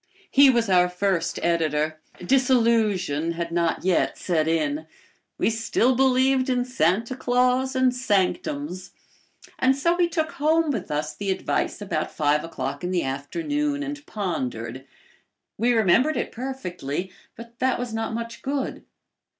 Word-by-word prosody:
He 275 0 +7
was 235 -3 +2
our 180 -2 +4
first 180 -2 -1
editor. 155 -2 0 0.2
Disillusion 220 - +2
had 170 0 -4
not 170 0 0
yet 185 -2 +1
set 160 -4 0
in. 155 -1 0 0.5
We - - +1
still 230 +3 +1
believed 260 +1 +3
in 245 -1 +1
Santa 230 +1 0
Claus 255 +1 +1
and 260 -1 +3
sanctums. 185 - -1 0.7
And 260 +1 +4
so 335 +5 +2
we 350 -1 +2
took 315 -2 -1
home 315 +1 +2
with 210 -8 -4
us 150 +1 -2
the 200 +4 -4
advice 190 +2 -1
about 155 -6 -2
five 150 0 +1
o'clock 165 - -5
and 180 +1 -2 1.1
pondered. 130 - -4 0.7
We 240 +3 +3
remembered 235 - +3
it - - -2
perfectly, 190 - -5 0.2
but 235 +1 -12
that 260 0 +1
was 245 -2 -4
not 225 0 -2
much 230 0 -6
good. 275 0 -3
215 Hz, 135 wpm, -24 LUFS, 170-255 Hz, 1.1 s, He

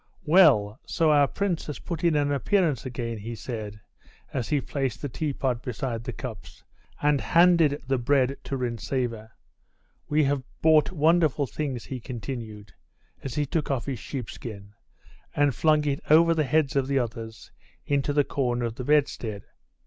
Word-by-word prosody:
"Well, 140 - +5
so 160 -2 +1
our 145 -2 +5
prince 190 -2 -2
has 150 - -5
put 170 -2 -6
in 170 -2 +3
an 145 -1 +1
appearance 145 - +1
again," 115 -3 -4
he 115 +3 -6
said, 110 -3 -6 0.5
as 125 -4 -2
he 150 - +2
placed 135 -2 -3
the 145 - -2
teapot 130 -3 -2
beside 120 -2 -4
the - - -3
cups, 120 -6 -9 0.4
and 145 -2 +3
handed 170 -4 +4
the 135 -1 0
bread 135 +1 +2
to 135 - -3
Rintzeva. 115 -2 -3 0.8
"We 150 +1 +3
have 140 -1 +1 0.2
bought 155 0 +4
wonderful 160 -3 +3
things," 135 -3 -4
he 130 - -5
continued, 110 -4 -7 0.5
as 135 -3 -5
he 150 - +1
took 150 +2 -2
off 130 -5 -1
his 135 -5 -4
sheepskin, 110 -6 -7 0.6
and 145 -2 +3
flung 155 +2 +2
it 140 -1 0
over 165 +2 +6
the 155 -2 +1
heads 145 0 +1
of 135 -1 +1
the 140 0 +1
others 115 -2 -4 0.3
into 140 0 0
the 145 0 +3
corner 120 -4 -1
of 115 - -3
the 125 - -4
bedstead. 125 -7 0
135 Hz, 165 wpm, -26 LUFS, 120-150 Hz, 0.8 s, over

